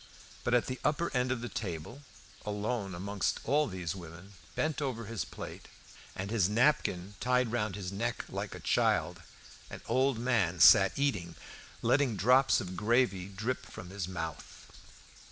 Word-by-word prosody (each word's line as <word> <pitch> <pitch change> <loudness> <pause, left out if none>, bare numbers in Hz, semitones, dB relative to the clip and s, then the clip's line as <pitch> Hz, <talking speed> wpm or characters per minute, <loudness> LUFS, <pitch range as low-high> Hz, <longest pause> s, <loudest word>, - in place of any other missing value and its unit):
But 120 - +2
at 120 - +3
the 130 0 -4
upper 170 +3 +1
end 125 0 +1
of 125 -3 -1
the 120 - -4
table, 100 - -5 0.4
alone 105 -1 -2
amongst 100 +3 -1
all 150 +1 +2
these 90 -3 -4
women, 85 +2 -11 0.2
bent 155 -1 -1
over 125 -5 -3
his 105 -6 -3
full - - -13
plate, - - -8 0.5
and 100 +2 -4
his 105 -5 +2
napkin 105 -6 +1
tied 125 -2 +2
round 105 -5 -1
his 95 -2 -5
neck 115 +4 -2
like - - -5
a - - -8
child, - - +1 0.5
an - - -8
old 130 -1 +2
man 115 -8 +1
sat - - +7
eating, 115 -12 -1 0.5
letting 135 -5 +3
drops 125 +6 +4
of 95 -1 -5
gravy 105 -3 +2
drip 110 +6 -3
from 90 0 -10
his 95 -3 -4
mouth. 85 -4 -7
105 Hz, 160 wpm, -31 LUFS, 95-125 Hz, 0.5 s, sat